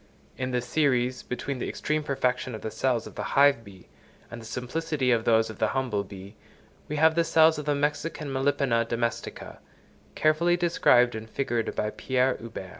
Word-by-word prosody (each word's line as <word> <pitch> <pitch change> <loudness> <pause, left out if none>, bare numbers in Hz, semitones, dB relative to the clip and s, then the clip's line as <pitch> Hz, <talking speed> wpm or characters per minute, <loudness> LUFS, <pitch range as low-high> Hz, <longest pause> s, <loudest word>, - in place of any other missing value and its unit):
In 130 0 -3
the 125 -1 0
series 125 -3 +1
between 125 +1 -5
the - - -3
extreme 155 0 -1
perfection 130 -4 -1
of 110 - -8
the 110 - -5
cells 125 -2 0
of - - -10
the - - -5 0.2
hive 140 -4 +5
bee 95 -4 -15 0.4
and 120 -1 -8
the 110 - -10
simplicity 130 +3 -2
of 115 -2 +1
those 110 -1 +3
of - - -13
the - - +2
humble 120 -6 -1
bee, 100 +1 -11 0.5
we 150 - -4
have 160 +1 +4
the 170 +1 +2
cells 160 -1 +4
of 150 - -6
the 145 -1 +1
Mexican 150 0 -2
Melipona 130 -3 +1
domestica, 115 0 -4 0.6
carefully 170 +3 +2
described 125 -8 +3
and 110 0 -7
figured 120 -2 -2
by 105 - -1
Pierre 130 +2 0
Huber. 110 -5 -8
130 Hz, 185 wpm, -26 LUFS, 115-150 Hz, 0.6 s, hive